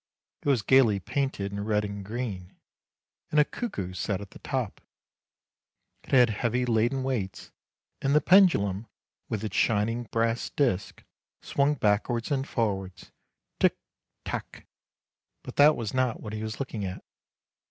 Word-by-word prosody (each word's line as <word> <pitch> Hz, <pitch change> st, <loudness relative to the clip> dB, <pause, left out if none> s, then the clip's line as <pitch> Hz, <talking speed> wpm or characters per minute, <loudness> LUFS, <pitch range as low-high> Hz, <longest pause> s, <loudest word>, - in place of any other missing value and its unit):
It -, -, -1 dB
was 125 Hz, -7 st, +3 dB
gaily 115 Hz, -4 st, +5 dB
painted 105 Hz, -3 st, -2 dB
in 100 Hz, 0 st, -4 dB
red 105 Hz, 0 st, +1 dB
and 100 Hz, -1 st, -6 dB
green, 100 Hz, -4 st, -5 dB, 0.7 s
and 150 Hz, -, +3 dB
a 150 Hz, -, +6 dB
cuckoo 100 Hz, -, -5 dB
sat 95 Hz, +1 st, -2 dB
at 100 Hz, -1 st, -10 dB
the -, -, -13 dB
top; 130 Hz, -7 st, -3 dB, 1.2 s
it -, -, -17 dB
had 125 Hz, -3 st, +5 dB
heavy 120 Hz, +3 st, 0 dB
laden 120 Hz, +3 st, +1 dB
weights, 115 Hz, -8 st, -3 dB, 0.5 s
and 140 Hz, +2 st, +2 dB
the -, -, +7 dB
pendulum, 120 Hz, -, +4 dB, 0.4 s
with 110 Hz, -1 st, -2 dB
its 110 Hz, -, -4 dB
shining 115 Hz, +2 st, +1 dB
brass 115 Hz, +1 st, 0 dB
disc, 120 Hz, -10 st, -1 dB, 0.4 s
swung 140 Hz, +1 st, +1 dB
backwards 115 Hz, +2 st, 0 dB
and 135 Hz, -1 st, 0 dB
forwards, 95 Hz, -5 st, -2 dB, 0.2 s
' -, -, -56 dB
Tick, -, -, +3 dB, 0.5 s
tack -, -, -6 dB, 0.4 s
'; -, -, -58 dB
but -, -, -9 dB
that 150 Hz, +2 st, +7 dB
was 110 Hz, -3 st, -4 dB
not 130 Hz, -3 st, +1 dB
what 105 Hz, -, -7 dB
he 110 Hz, -, -4 dB
was 110 Hz, 0 st, -5 dB
looking 120 Hz, -6 st, -4 dB
at. 95 Hz, -1 st, -5 dB
115 Hz, 155 wpm, -27 LUFS, 100-130 Hz, 1.2 s, the